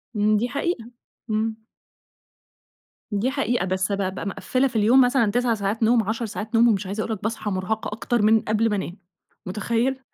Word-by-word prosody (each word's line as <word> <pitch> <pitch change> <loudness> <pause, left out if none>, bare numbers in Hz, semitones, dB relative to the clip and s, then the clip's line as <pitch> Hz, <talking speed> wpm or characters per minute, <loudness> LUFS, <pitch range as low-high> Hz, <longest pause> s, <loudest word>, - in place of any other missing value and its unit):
إمم، 210 0 +3
دي 240 +4 -1
حقيقة 280 -4 -3 0.4
إمم. 220 +1 -1 1.5
دي 210 +6 0
حقيقة، 245 -7 0
بس 185 +1 -1
بابقى 190 -1 -2
مِقفلة 255 +6 0
في 250 - -10
اليوم 225 +5 +5
مثلًا 245 -4 +3
9 245 +1 +1
ساعات 210 +1 -1
نوم 230 0 +4
10 225 +3 -2
ساعات 220 +1 -5
نوم 235 +1 +6
ومش 210 -3 +1
عايزة 205 +3 -2
أقول 225 - -2
لك 210 - -8
باصحى 220 -1 -2
مرهَقة 190 +4 -2
أكتر 225 +2 -1
من 220 +1 +5
قبل 220 +1 +1
ما 210 - 0
انام، 190 -1 -4 0.5
متخيِل؟ 230 +7 -1
220 Hz, 180 wpm, -24 LUFS, 205-240 Hz, 1.5 s, نوم